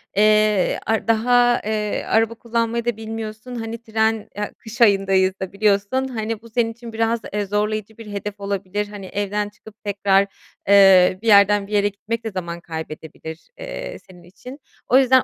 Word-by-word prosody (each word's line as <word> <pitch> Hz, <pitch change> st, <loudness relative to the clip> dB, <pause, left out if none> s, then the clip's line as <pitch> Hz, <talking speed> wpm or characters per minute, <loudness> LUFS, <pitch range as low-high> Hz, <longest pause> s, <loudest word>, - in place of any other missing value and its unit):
eee, 215 Hz, -1 st, +3 dB
ar 220 Hz, +1 st, 0 dB
daha, 240 Hz, +2 st, +3 dB
eee, 210 Hz, -1 st, -1 dB
araba 225 Hz, +1 st, +2 dB
kullanmayı 235 Hz, 0 st, -2 dB
da 240 Hz, -3 st, -1 dB
bilmiyorsun, 220 Hz, +2 st, -6 dB
hani, 225 Hz, 0 st, -5 dB
tren, 220 Hz, -1 st, 0 dB
a 210 Hz, -, -3 dB
kış 220 Hz, 0 st, -10 dB
ayındayız 195 Hz, -3 st, +4 dB
da 190 Hz, -1 st, -5 dB
biliyorsun, 205 Hz, +6 st, +1 dB
hani, 225 Hz, -3 st, -4 dB
bu 230 Hz, -, -14 dB
senin 225 Hz, 0 st, 0 dB
için 230 Hz, 0 st, -11 dB
biraz, 225 Hz, +1 st, +1 dB
eee, 205 Hz, 0 st, -1 dB
zorlayıcı 210 Hz, +1 st, -2 dB
bir 220 Hz, -2 st, -10 dB
hedef 205 Hz, 0 st, -5 dB
olabilir. 200 Hz, +1 st, -3 dB
Hani, 205 Hz, -2 st, -9 dB
evden 205 Hz, +1 st, -2 dB
çıkıp 215 Hz, 0 st, -16 dB
tekrar, 200 Hz, -1 st, +2 dB, 0.4 s
eee, 190 Hz, -2 st, +6 dB
bir 230 Hz, -, -6 dB
yerden 200 Hz, -1 st, +5 dB
bir -, -, -14 dB
yere 205 Hz, 0 st, +3 dB
gitmek 225 Hz, +3 st, -5 dB
de 225 Hz, -, -4 dB
zaman 170 Hz, -2 st, -5 dB
kaybedebilir, 160 Hz, 0 st, -8 dB
eee, -, -, -6 dB
senin 180 Hz, -2 st, -17 dB
için. 250 Hz, -, -12 dB, 0.3 s
O 255 Hz, -, +5 dB
yüzden 260 Hz, -1 st, +5 dB
210 Hz, 170 wpm, -21 LUFS, 200-225 Hz, 0.4 s, eee